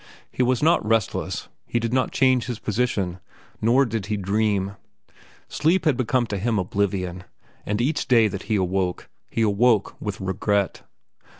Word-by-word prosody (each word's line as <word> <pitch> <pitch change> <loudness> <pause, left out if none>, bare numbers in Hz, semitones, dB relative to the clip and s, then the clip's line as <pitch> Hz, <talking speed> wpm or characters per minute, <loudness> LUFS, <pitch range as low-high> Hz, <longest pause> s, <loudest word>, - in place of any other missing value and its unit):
He - - -2
was 125 +1 +2
not 165 -3 +4
restless. 110 -1 -1 0.2
He 120 - 0
did 115 +1 -2
not 130 0 +1
change 130 -2 +3
his 120 -3 -3
position, 105 -6 -1 0.4
nor 125 +5 +4
did 115 -5 -3
he 105 -1 -1
dream. 100 0 0 0.7
Sleep 170 +4 +1
had 150 -4 +4
become 125 0 +1
to 105 -3 -4
him 110 +2 0
oblivion, 95 -1 -1 0.4
and 105 +1 0
each 140 +6 0
day 115 -4 +5
that 100 -2 -5
he 110 - +2
awoke, 95 -1 -1 0.2
he 115 - 0
awoke 110 0 +2
with 105 -3 -4
regret. 100 +1 -1
110 Hz, 160 wpm, -24 LUFS, 100-125 Hz, 0.7 s, day